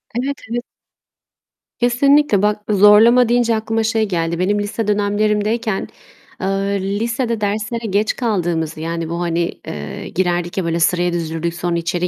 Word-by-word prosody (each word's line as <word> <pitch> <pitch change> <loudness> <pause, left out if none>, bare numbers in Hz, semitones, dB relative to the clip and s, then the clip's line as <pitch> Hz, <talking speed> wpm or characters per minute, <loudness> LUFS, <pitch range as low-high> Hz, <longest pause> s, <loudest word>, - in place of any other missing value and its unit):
Evet, 270 +3 -2
evet. 240 0 -2 1.2
Kesinlikle. 255 -1 +3
Bak, 210 0 +1
zorlama 215 +4 +6
deyince 240 -1 +2
aklıma 225 0 -1
şey 220 0 +1
geldi. 170 -2 -2
Benim 205 +3 +1
lise 210 +1 -3
dönemlerimdeyken, 210 +1 0 0.5
eee, 190 - -1 0.5
lisede 230 0 -1
derslere 220 +3 -2
geç 205 +3 +1
kaldığımızı 170 - -1 0.3
bu, 170 +1 -3
hani, 170 0 0 0.2
eee, 75 -1 -6
girerdik 175 -1 -1
ya, 190 - 0
böyle 165 0 -1
sıraya 175 +1 +2
dizilirdik, 165 0 -2
sonra 175 0 -1
içeri 175 +1 -1
205 Hz, 135 wpm, -18 LUFS, 175-225 Hz, 1.2 s, zorlama